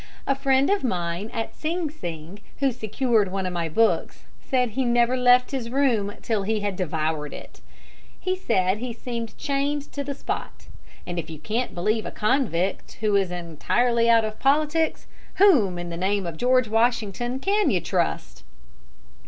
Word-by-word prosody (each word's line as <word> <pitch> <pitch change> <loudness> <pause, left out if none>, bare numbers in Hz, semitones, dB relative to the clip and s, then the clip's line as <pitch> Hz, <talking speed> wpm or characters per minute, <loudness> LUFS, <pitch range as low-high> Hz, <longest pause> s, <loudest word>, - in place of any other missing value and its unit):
A 275 - +2
friend 270 +2 +2
of 405 - +1
mine 175 -2 -2
at 225 -1 -4
Sing 330 +1 -2
Sing, 175 - -7 0.2
who 275 -1 +2
secured 225 -3 0
one 190 0 -2
of 180 - -2
my 170 -2 -2
books, 225 +8 +1 0.2
said 250 -3 0
he 265 +5 -1
never 240 0 +3
left 250 0 +4
his 255 -4 -3
room 240 -6 +1
till 220 -3 0
he 215 +2 -1
had 205 -2 -2
devoured 155 -4 -2
it. - - -12 0.6
He 370 0 -1
said 200 - +1
he 245 0 -4
seemed 235 -1 -6
chained 285 +1 -1
to 285 - -4
the 280 0 -4
spot; - - -5 0.4
and 175 -1 -3
if 160 0 -6
you 160 - -7
can't 220 - -3
believe 215 +5 0
a - - -6
convict 210 - 0
who 210 -2 +2
is 195 -2 +2
entirely 230 +8 0
out 230 -1 +5
of 215 0 -6
politics, 305 +3 +1 0.3
whom, 260 - +5
in 175 0 -5
the 170 - -5
name 195 +2 0
of 170 -2 -4
George 255 +4 +3
Washington, 230 +1 0
can 400 +8 +2
you 185 - +2
trust? - - -2
225 Hz, 170 wpm, -24 LUFS, 185-260 Hz, 0.6 s, out